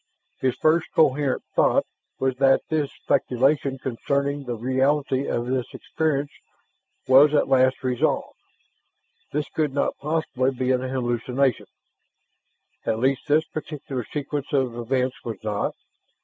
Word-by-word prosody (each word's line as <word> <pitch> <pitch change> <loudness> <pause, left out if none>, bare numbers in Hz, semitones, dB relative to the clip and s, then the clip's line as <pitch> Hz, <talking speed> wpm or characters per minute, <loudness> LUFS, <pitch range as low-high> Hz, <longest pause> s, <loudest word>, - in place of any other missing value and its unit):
His 130 -1 0
first 160 +4 +2
coherent 140 -3 +2
thought - - +3 0.3
was 130 -1 0
that 135 0 +4
his 150 -3 0
speculation 135 +1 +1
concerning 140 +3 -2
the 120 -1 -3
reality 130 +3 +1
of 120 - -1
this 125 -1 -1
experience 145 -3 -1 0.8
was 140 +3 +7
at 145 - +3
last 130 0 +3
resolved. 125 -2 -1 0.9
This 150 +1 -1
could 150 -3 -1
not 140 - 0
possibly 145 -4 0
be 130 -1 -1
an 125 -1 +2
hallucination; 130 0 -1 1.2
at 110 - 0
least 130 +5 0
this 155 +2 +3
particular 150 -5 -5
sequence 145 -1 -4
of 130 -4 +1
events 125 +2 -2
was 115 -2 -5
not. 105 -2 -2
135 Hz, 125 wpm, -24 LUFS, 130-145 Hz, 1.2 s, was